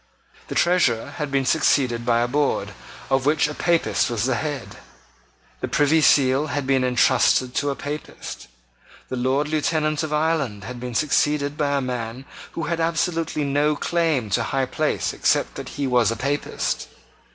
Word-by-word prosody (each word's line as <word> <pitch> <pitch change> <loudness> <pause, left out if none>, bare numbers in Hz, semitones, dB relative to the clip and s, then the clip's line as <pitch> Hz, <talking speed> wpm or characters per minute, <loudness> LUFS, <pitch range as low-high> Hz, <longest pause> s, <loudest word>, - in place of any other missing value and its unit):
The - - -6
Treasurer 170 -11 +2
had 150 -3 -3
been 135 -1 0
succeeded 125 -5 +2
by 120 -1 +3
a 120 - +1
board, 145 +3 0 0.4
of 135 0 +2
which 150 0 +3
a 150 - -5
Papist 170 -3 +1
was 115 -3 -1
the 130 +1 +1
head. 145 0 -4 0.8
The - - -3
Privy 150 +2 +3
Seal 140 0 +4
had 145 -2 -2
been 135 -1 +2
entrusted 125 0 +3
to 145 - 0
a 140 - -2
Papist. 145 - -7 0.6
The - - -3
Lord 130 +4 0
Lieutenant 155 0 0
of 155 -2 -4
Ireland 150 -9 0
had 125 +3 -7
been 125 -1 -6
succeeded 145 0 +1
by 145 -1 0
a - - 0
man 125 0 -4 0.3
who 165 - -4
had 170 0 -2
absolutely 165 -1 0
no 145 +2 +1
claim 155 -9 0
to - - +2
high 135 -1 0
place 150 +4 -1
except - - +1
that - - -7
he 145 - -1
was 125 -3 +3
a 115 - -1
Papist. 140 +5 -2
140 Hz, 170 wpm, -23 LUFS, 125-150 Hz, 0.8 s, Seal